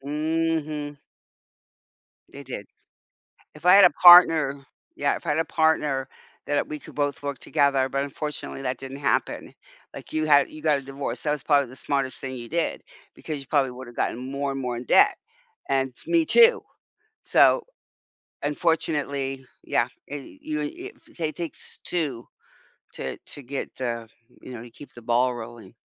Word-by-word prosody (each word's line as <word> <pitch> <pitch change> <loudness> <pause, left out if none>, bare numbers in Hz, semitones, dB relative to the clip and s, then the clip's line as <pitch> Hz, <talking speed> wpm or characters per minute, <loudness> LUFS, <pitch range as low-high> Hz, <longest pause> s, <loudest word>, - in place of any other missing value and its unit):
Mhm. 155 0 -2 1.3
They 140 - -10
did. 125 -6 -7 0.9
If 150 - -14
I 180 - +8
had 200 - +9
a - - +8
partner 165 -5 +8 0.4
Yeah, 145 0 +1
if - - -10
I - - -2
had 150 +2 +1
a 165 - +1
partner, 150 -4 +1 0.4
that, 145 - 0
uh, - - 0
we 150 - -5
could - - -13
both 145 -1 -2
work 140 -2 -4
together, 140 -3 +2
but 140 +1 -1
unfortunately 145 0 -5
that 125 0 -2
didn't 135 0 -8
happen. 135 - -1 0.4
Like, - - -10
you 155 0 0
had 145 -2 +5
you 155 - -10
got 150 -2 +2
a - - -10
divorce, 135 -2 -5
that 150 - +1
was 150 -3 -1
probably 140 -4 +3
the 130 - -11
smartest 135 -2 -1
thing 130 -1 -5
you 120 -1 -8
did, 170 +1 -2 0.3
because 155 -2 -6
you 135 - -10
probably 135 -3 +2
would 125 0 -10
have 120 - -13
gotten - - -1
more 140 0 -2
and 135 - -4
more 125 -2 -3
in 120 - -6
debt, - - +5 0.5
and 135 -1 0
me 335 -1 +3
too! 465 +5 +6 0.6
So, - - +4 0.8
unfortunately, 145 -3 -1 0.2
yeah, - - +1 0.2
e 145 - -8
you 310 0 -3
e - - -1
e 345 +4 -10
if - - -28
th - - -16
it 150 - -17
takes 170 -2 -5
2 145 -9 -2 0.7
to - - -5
to 145 - -7
get 135 +2 -6
the 115 -3 -4 0.3
you 130 - -9
know, 120 - -8
to 120 - -12
keep 145 - -14
the 120 - -12
ball 120 +2 +2
rolling. 120 -1 -10
140 Hz, 180 wpm, -25 LUFS, 130-155 Hz, 1.3 s, had